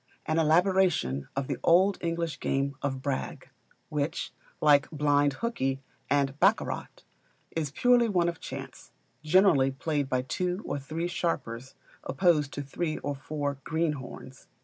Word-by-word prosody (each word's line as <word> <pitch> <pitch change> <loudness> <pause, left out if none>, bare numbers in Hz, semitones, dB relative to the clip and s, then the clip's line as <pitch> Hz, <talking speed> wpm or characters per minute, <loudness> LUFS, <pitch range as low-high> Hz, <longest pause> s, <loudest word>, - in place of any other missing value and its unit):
An 160 +1 +1
elaboration 165 - +2
of 135 0 -1
the - - -3
old 185 +4 +4
English 170 -1 -2
game 140 +1 0
of 135 -2 -3
Brag, 140 -2 -4 0.4
which, 150 +2 -2 0.3
like 145 -2 +4
Blind 145 -2 +2
Hookey 135 - -1 0.3
and 140 0 +1
Baccarat, - - +2 0.6
is 155 -3 -2
purely 240 - +3
one 175 -4 +2
of 170 -1 -3
chance, - - -8 0.3
generally 155 -4 +4
played 145 0 -2
by 130 -1 0
two 180 +8 -2
or 145 - -2
three 155 +5 -4
sharpers 135 -8 -3 0.3
opposed 150 -1 +2
to 145 - -4
three 155 +3 -3
or 145 - -3
four 140 0 -4
greenhorns. 150 -5 -4
150 Hz, 135 wpm, -28 LUFS, 135-170 Hz, 0.6 s, old